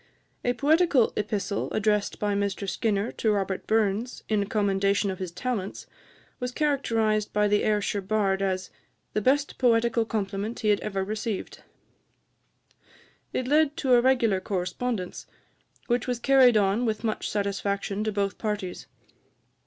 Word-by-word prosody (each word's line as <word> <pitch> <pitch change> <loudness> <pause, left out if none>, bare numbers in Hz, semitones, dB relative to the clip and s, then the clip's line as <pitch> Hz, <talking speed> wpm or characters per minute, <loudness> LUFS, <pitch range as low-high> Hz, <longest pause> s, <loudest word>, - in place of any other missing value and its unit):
A 245 - +1
poetical 295 -2 +3
epistle 205 -1 -2
addressed 210 -1 +1
by 205 -1 0
Mr 200 0 -2
Skinner 205 +2 0
to 220 - -1
Robert 195 -2 -2
Burns, 220 +2 0
in 205 -2 0
commendation 200 -1 +1
of 185 - -7
his 185 -2 -4
talents, 200 +1 -4 0.5
was 250 0 -3
characterized 230 -7 0
by 210 0 +3
the 205 0 +2
Ayrshire 210 -1 0
Bard 195 -1 0
as 185 -1 -2 0.4
"the 215 - 0
best 285 +6 +1
poetical 235 -1 +3
compliment 210 +1 -3
he 215 - +1
had 205 - +3
ever 195 -2 -2
received." 215 0 -4 1.7
It 255 - -2
led 300 +1 +3
to 265 -5 +2
a 240 - +6
regular 240 -6 +3
correspondence, 185 +2 -3 0.6
which 240 0 0
was 250 -1 0
carried 255 -2 +5
on 200 +3 +2
with 220 -2 -1
much 220 -2 -2
satisfaction 200 0 -2
to 215 - -1
both 200 -2 -2
parties. 210 -4 -4
210 Hz, 140 wpm, -26 LUFS, 200-240 Hz, 1.7 s, a